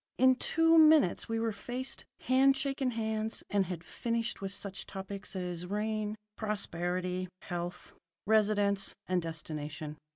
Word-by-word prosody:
In 260 Hz, +1 st, +6 dB
two 325 Hz, +5 st, +4 dB
minutes 305 Hz, -, +5 dB
we 225 Hz, 0 st, 0 dB
were 225 Hz, 0 st, +1 dB
faced, 250 Hz, +5 st, -5 dB, 0.2 s
had 270 Hz, +2 st, +4 dB
shaken 275 Hz, -2 st, 0 dB
hands, 220 Hz, -1 st, -2 dB
and 200 Hz, -3 st, +2 dB
had 175 Hz, -2 st, -5 dB
finished 230 Hz, +3 st, -2 dB
with 195 Hz, -1 st, -3 dB
such 200 Hz, -1 st, -5 dB
topics 195 Hz, +1 st, -6 dB
as 180 Hz, -1 st, -3 dB
rain, 210 Hz, +1 st, -1 dB, 0.2 s
prosperity, 185 Hz, -3 st, -2 dB, 0.2 s
health, 175 Hz, 0 st, -5 dB, 0.3 s
residence, 205 Hz, -2 st, +2 dB
and 180 Hz, -1 st, +2 dB
destination. 155 Hz, -2 st, -5 dB
205 Hz, 130 wpm, -32 LUFS, 180-230 Hz, 0.3 s, In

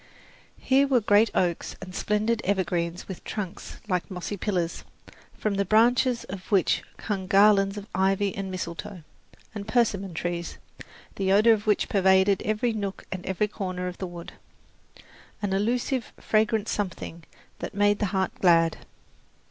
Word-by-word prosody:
Here 275 Hz, +1 st, +3 dB
were 260 Hz, -3 st, +4 dB
great 210 Hz, +1 st, +4 dB
oaks 175 Hz, -2 st, 0 dB
and 185 Hz, -1 st, -9 dB
splendid 210 Hz, +4 st, 0 dB
evergreens 180 Hz, -3 st, -1 dB
with 190 Hz, -, -8 dB
trunks 195 Hz, -5 st, -6 dB
like 180 Hz, -3 st, -1 dB
mossy 185 Hz, +2 st, -4 dB
pillars, 180 Hz, -4 st, -2 dB, 0.5 s
from 215 Hz, -, -1 dB
the 200 Hz, 0 st, +1 dB
branches 235 Hz, +4 st, +3 dB
of 190 Hz, +1 st, -9 dB
which 195 Hz, -4 st, +3 dB, 0.2 s
hung 195 Hz, -4 st, -3 dB
garlands 195 Hz, 0 st, +4 dB
of 205 Hz, -, -6 dB
ivy 195 Hz, +1 st, +1 dB
and 195 Hz, -1 st, -4 dB
mistletoe, 180 Hz, -1 st, -6 dB, 0.5 s
and 205 Hz, -1 st, -6 dB
persimmon 200 Hz, -6 st, +1 dB
trees, 170 Hz, 0 st, -3 dB, 0.6 s
the 190 Hz, -1 st, +1 dB
odour 215 Hz, +4 st, +6 dB
of 215 Hz, -1 st, -3 dB
which 210 Hz, -, +2 dB
pervaded 190 Hz, 0 st, +3 dB
every 215 Hz, +2 st, 0 dB
nook 200 Hz, -3 st, -4 dB
and 185 Hz, -1 st, -5 dB, 0.2 s
corner 185 Hz, -3 st, -4 dB
of 180 Hz, -, -7 dB
the 185 Hz, -, -3 dB
wood 175 Hz, -1 st, -9 dB, 1.1 s
an 200 Hz, -2 st, -2 dB
illusive, 240 Hz, +5 st, 0 dB
fragrant 215 Hz, 0 st, +1 dB
something 180 Hz, -4 st, -4 dB, 0.4 s
that -, -, -6 dB
made 205 Hz, 0 st, +3 dB
the 205 Hz, -, +1 dB
heart 190 Hz, 0 st, -1 dB
glad. 165 Hz, -3 st, +4 dB
195 Hz, 145 wpm, -26 LUFS, 185-215 Hz, 1.1 s, odour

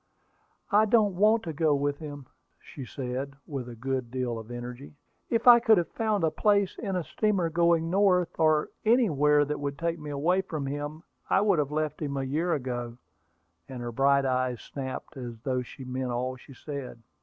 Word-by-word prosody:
"I 210 Hz, +2 st, +5 dB
don't 215 Hz, -2 st, +3 dB
want 215 Hz, +4 st, +4 dB
to 165 Hz, -, -4 dB
go 155 Hz, -1 st, +2 dB
with 145 Hz, 0 st, -1 dB
him," 145 Hz, -3 st, -8 dB, 0.5 s
said 135 Hz, -3 st, -7 dB
she, 130 Hz, -1 st, -3 dB, 0.2 s
with 135 Hz, -4 st, -5 dB
a 120 Hz, -, -8 dB
good 130 Hz, +1 st, -3 dB
deal 125 Hz, -2 st, -2 dB
of 110 Hz, 0 st, -11 dB
energy. 120 Hz, +4 st, -8 dB, 0.3 s
"If 230 Hz, -1 st, 0 dB
I 240 Hz, -1 st, +10 dB
could 225 Hz, -3 st, +5 dB
have 175 Hz, -, 0 dB
found 215 Hz, -5 st, -1 dB
a 160 Hz, -, +2 dB
place 200 Hz, -2 st, +2 dB
in 195 Hz, -4 st, -3 dB
a 180 Hz, -, -1 dB
steamer 190 Hz, -3 st, 0 dB
going 170 Hz, -1 st, +2 dB
north, 185 Hz, -3 st, +2 dB
or 155 Hz, -1 st, +3 dB
anywhere 150 Hz, -, +4 dB
that 150 Hz, 0 st, -3 dB
would 140 Hz, 0 st, -3 dB
take 170 Hz, 0 st, -2 dB
me 150 Hz, -1 st, -7 dB
away 165 Hz, +7 st, +1 dB
from 155 Hz, -6 st, -5 dB
him, 145 Hz, +3 st, -5 dB, 0.3 s
I 190 Hz, -, +4 dB
would 200 Hz, -5 st, +3 dB
have 145 Hz, -2 st, 0 dB
left 155 Hz, 0 st, -2 dB
him 140 Hz, -2 st, -2 dB
a 135 Hz, -, -1 dB
year 155 Hz, +7 st, -1 dB
ago;" 120 Hz, -3 st, -4 dB, 0.7 s
and 130 Hz, -, -7 dB
her 120 Hz, -, -4 dB
bright 140 Hz, +3 st, +3 dB
eyes 130 Hz, -2 st, 0 dB
snapped 135 Hz, +1 st, -7 dB
as 120 Hz, -3 st, -7 dB
though 130 Hz, -2 st, 0 dB
she 130 Hz, +3 st, -10 dB
meant 130 Hz, 0 st, -3 dB
all 125 Hz, +2 st, -2 dB
she 130 Hz, +1 st, -15 dB
said. 135 Hz, -5 st, -7 dB
145 Hz, 195 wpm, -28 LUFS, 130-175 Hz, 0.7 s, I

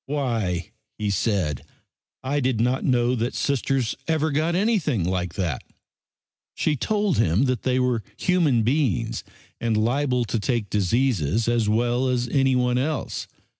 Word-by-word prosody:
"Why," 115 Hz, -, -1 dB, 0.3 s
he 105 Hz, -1 st, -1 dB
said, 95 Hz, -, 0 dB, 0.6 s
"I 140 Hz, +3 st, 0 dB
did 130 Hz, -4 st, 0 dB
not 125 Hz, +3 st, +1 dB
know 125 Hz, -1 st, +2 dB
that 120 Hz, 0 st, -2 dB
Sisters 135 Hz, -3 st, 0 dB
ever 160 Hz, -1 st, +1 dB
got 155 Hz, +4 st, +1 dB
anything 180 Hz, -, +1 dB
like 90 Hz, -1 st, -2 dB
that." 85 Hz, -9 st, -2 dB, 0.9 s
She 155 Hz, -, +1 dB
told 205 Hz, -, 0 dB
him 95 Hz, +2 st, +3 dB
that 125 Hz, -4 st, 0 dB
they 130 Hz, 0 st, +1 dB
were 125 Hz, -3 st, +1 dB, 0.2 s
human 160 Hz, -11 st, +2 dB
beings 130 Hz, -, 0 dB, 0.4 s
and 115 Hz, -2 st, 0 dB
liable 125 Hz, +2 st, +1 dB
to 115 Hz, -, -2 dB
take 115 Hz, -2 st, -1 dB
diseases 105 Hz, -, +1 dB
as 115 Hz, -3 st, +1 dB
well 120 Hz, +4 st, +1 dB
as 125 Hz, -1 st, 0 dB
anyone 125 Hz, -2 st, +2 dB
else. 145 Hz, 0 st, -2 dB
125 Hz, 140 wpm, -24 LUFS, 110-140 Hz, 0.9 s, him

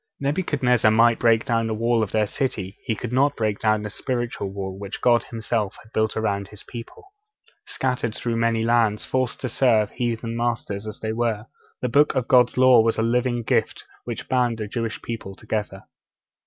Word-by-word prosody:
Nebuchadnezzar 140 Hz, -6 st, +2 dB
might 115 Hz, +1 st, +4 dB
break 115 Hz, -1 st, +3 dB
down 115 Hz, -1 st, +1 dB
the 110 Hz, -, -2 dB
wall 115 Hz, +1 st, +1 dB
of 110 Hz, -, -2 dB
their 110 Hz, -1 st, +2 dB
city, 100 Hz, -4 st, -3 dB
he 110 Hz, -, 0 dB
could 115 Hz, -, -5 dB
not 140 Hz, +3 st, +3 dB
break 110 Hz, -2 st, -1 dB
down 110 Hz, -1 st, +1 dB
the 105 Hz, -, -4 dB
spiritual 120 Hz, -4 st, -3 dB
wall 95 Hz, -1 st, -5 dB
which 100 Hz, 0 st, -6 dB
God 120 Hz, -2 st, +4 dB
Himself 110 Hz, -3 st, -2 dB
had 110 Hz, -, -22 dB
built 110 Hz, -1 st, +1 dB
round 100 Hz, -3 st, -1 dB
His 105 Hz, -1 st, -12 dB
people. 115 Hz, -2 st, -10 dB, 0.6 s
Scattered 125 Hz, -4 st, -2 dB
through 115 Hz, -1 st, -2 dB
many 115 Hz, -1 st, +1 dB
lands, 115 Hz, -2 st, +2 dB
forced 130 Hz, -2 st, -1 dB
to 130 Hz, -, -2 dB
serve 115 Hz, -3 st, +2 dB
heathen 115 Hz, -1 st, -3 dB
masters 115 Hz, -3 st, -2 dB
as 105 Hz, -, -7 dB
they 110 Hz, 0 st, -2 dB
were, 115 Hz, -2 st, -1 dB, 0.4 s
the -, -, +2 dB
Book 145 Hz, +5 st, +3 dB
of 130 Hz, -2 st, 0 dB
God's 125 Hz, -1 st, +4 dB
Law 130 Hz, -2 st, +7 dB
was 115 Hz, 0 st, +1 dB
a 110 Hz, -, +1 dB
living 120 Hz, +1 st, +1 dB
gift -, -, 0 dB, 0.2 s
which -, -, -5 dB
bound 125 Hz, -3 st, +1 dB
the 105 Hz, -2 st, -4 dB
Jewish 115 Hz, 0 st, -3 dB
people 110 Hz, -4 st, -6 dB
together. 105 Hz, -2 st, -4 dB
115 Hz, 190 wpm, -23 LUFS, 110-120 Hz, 0.6 s, Law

